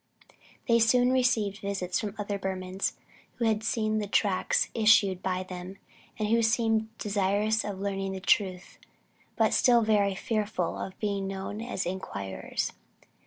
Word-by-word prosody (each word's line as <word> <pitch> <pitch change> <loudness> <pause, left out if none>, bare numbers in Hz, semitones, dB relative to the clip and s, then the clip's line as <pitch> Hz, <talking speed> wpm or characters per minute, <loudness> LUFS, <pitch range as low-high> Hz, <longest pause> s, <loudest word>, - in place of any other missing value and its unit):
They 235 -1 +5
soon 245 +2 +4
received 235 -6 +1
visits 190 -3 -2
from 210 -2 -4
other 205 -1 -3
Burmans 190 0 -2 0.4
who 235 - -1
had 220 -1 +2
seen 215 -1 0
the 205 - -3
tracts 200 -2 +1
issued 210 -4 +4
by 185 0 -1
them; 185 +1 -8 0.4
and 215 - -1
who 230 +1 +4
seemed 220 -1 +2
desirous 205 +2 +1
of 200 -2 -4
learning 195 -1 -2
the 190 - -4
truth, 185 -1 0 0.6
but - - +2
still 240 -2 +5
very 205 -3 +2
fearful 210 -5 -2
of 190 - -6
being 200 -2 -1
known 195 +2 -5
as 230 -5 -3
inquirers. 100 - -4
205 Hz, 145 wpm, -28 LUFS, 190-220 Hz, 0.6 s, They